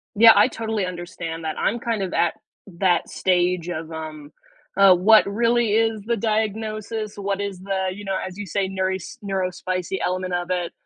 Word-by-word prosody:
Yeah, 225 +2 +9
I 205 - +6
totally 220 -4 -2
understand 170 -2 -6
that, 155 - -3
I'm 235 - 0
kind 230 -3 -2
of 185 - -3
at 170 -1 +2
that - - -31 0.4
that 180 -2 +2
stage 180 -1 +1
of, 165 -2 -5
um, 155 -2 -7 0.5
uh, 195 -1 +7
what 215 +5 +6
really 230 +2 +1
is 225 0 +2
the 235 0 +1
diagnosis, 215 0 -2
what 200 0 -2
is 200 -2 -4
the 190 0 -2
you 205 +2 -9
know, 195 -1 -2
as 185 +1 -9
you 205 - -5
say, 190 +2 -1
neuros 190 0 -3
neurospicy 185 -1 -2
element 185 0 -2
of 175 0 -2
it. 180 -2 -1
195 Hz, 180 wpm, -23 LUFS, 180-215 Hz, 0.5 s, Yeah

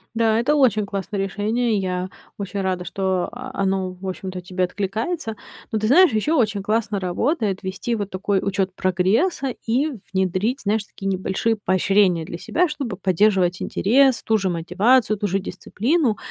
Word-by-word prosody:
Да, 225 -1 +3
это 255 +6 +2
очень 225 -7 +3
классное 200 0 -4
решение. 215 +4 0
Я 185 -1 -2 0.3
очень 200 0 -4
рада, 185 -2 -2
что, 190 -2 -1
а, 250 +2 -8
оно, 190 -1 0
в 185 +1 -9
общем-то, 185 0 -5
тебе 185 +1 -2
откликается. 220 - -3 0.4
Но 220 - 0
ты 215 - 0
знаешь, 350 +7 +6
ещё 295 +10 +1
очень 210 -5 +1
классно 210 0 0
работает 200 - -1
вести 190 +5 -2
вот 205 -3 -4
такой 195 +1 0
учёт 195 -1 0
прогресса 220 - +1
и 255 +7 +1 0.2
внедрить, 190 +7 0
знаешь, 210 +1 0
такие 195 - -8
небольшие 190 +4 0
поощрения 185 -2 +2
для 170 - -6
себя, 355 - +1
чтобы 285 -8 -4
поддерживать 185 -1 +2
интерес, 260 +4 +3
ту 220 - +2
же 195 -2 -1
мотивацию, 215 +7 +2
ту 205 - -2
же 195 +1 0
дисциплину. 225 - -1
200 Hz, 160 wpm, -22 LUFS, 185-230 Hz, 0.4 s, знаешь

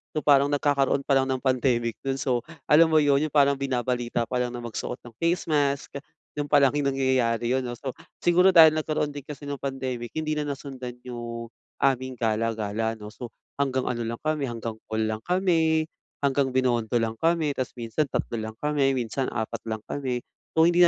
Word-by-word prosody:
So, 155 - -1
parang 140 -1 +6
nagkakaroon 140 -1 +2
pa 140 - +2
lang 135 0 0
ng 130 - +1
pandemic 125 -3 +1
nun. 135 0 -1
So, 125 -3 0 0.2
alam 160 +2 +6
mo 160 - +4
'yon, 145 0 +3
yung 150 - -14
parang 140 -1 +4
binabalita 125 -3 -1
pa 125 +2 -2
lang 125 0 -2
na 120 - -6
magsuot 120 +1 -4
ng 120 - -12
face 170 +2 +1
mask, 140 -1 0 0.3
dun 145 0 -3
palang 140 -3 +5
yung 140 -1 0
nangyayari 120 -3 +1
yun, 130 +1 +2
'no? 120 -1 -4
So, 130 +2 -5 0.3
siguro 180 +2 +5
dahil 160 -2 +10
nagkaroon 155 -1 -1
din 145 0 -7
kasi 145 -1 -8
nung 140 -1 -4
pandemic 130 -3 -4
hindi 155 -1 -1
na 150 -1 -2
nasundan 135 -3 -6
yung 120 -1 -6 0.3
aming 130 -1 +1
gala-gala, 110 -1 -1
'no? 105 -1 -10
So, 120 +2 -7 0.3
hanggang 130 -2 +1
ano 120 -2 -2
lang 115 +1 -3
kami, 155 -3 0
hanggang 115 -2 -5
call 110 0 -1
lang 110 0 -1
kami, 165 -4 +2 0.4
hanggang 135 -2 +1
Binondo 120 -3 +1
lang 115 -1 0
kami. 165 -2 +2
Tapos 130 -3 -4
minsan 120 +5 -1
3 120 -2 -2
lang 110 0 -5
kami, 145 -2 +2
minsan 125 +2 -2
4 110 0 -3
lang 110 -1 -4
kami. 125 -3 -3 0.3
So, 160 - +6
hindi 175 +1 +4
130 Hz, 195 wpm, -26 LUFS, 120-145 Hz, 0.4 s, dahil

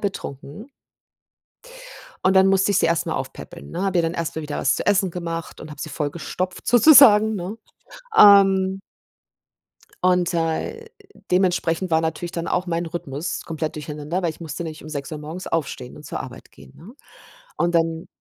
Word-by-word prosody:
betrunken. 190 - -6 1.6
Und 190 - +4
dann 190 0 +6
musste 195 +1 +3
ich 195 - +3
sie - - +3
erst 170 0 +1
mal 165 - -3
aufpäppeln, 135 +6 -8
ne? 175 - -4
Habe 190 -2 0
ihr - - +3
dann 165 +1 -2
erst 165 -1 -3
mal 160 - -3
wieder 150 -1 -5
was 135 - +1
zu - - -5
essen 195 -2 +2
gemacht 165 -1 -6
und 155 - -9
habe 145 - -11
sie - - -5
vollgestopft 170 +5 -4
sozusagen, 230 -4 +7
ne? 195 +3 -5 0.6
Ähm 195 - +6 1.2
und, 180 -1 +2
äh, 165 - -2 0.5
dementsprechend 180 -1 +1
war 160 0 +2
natürlich 165 +2 -3
dann 170 0 -4
auch 180 - -1
meine 170 -1 -3
Rhythmus 150 -1 -4
komplett 160 -1 -4
durcheinander, 150 +3 -4
weil 175 - -1
ich 160 - -6
musste 160 0 -6
nämlich 160 -2 -7
um 155 - -10
6:00 145 0 -5
morgens 160 +5 -8
aufstehen 140 -6 -4
und - - -13
zur - - -5
Arbeit - - -10
gehen, 70 -1 -17
ne, 190 +8 -13 0.6
und 175 0 0
dann 165 0 0
170 Hz, 175 wpm, -22 LUFS, 160-190 Hz, 1.6 s, sozusagen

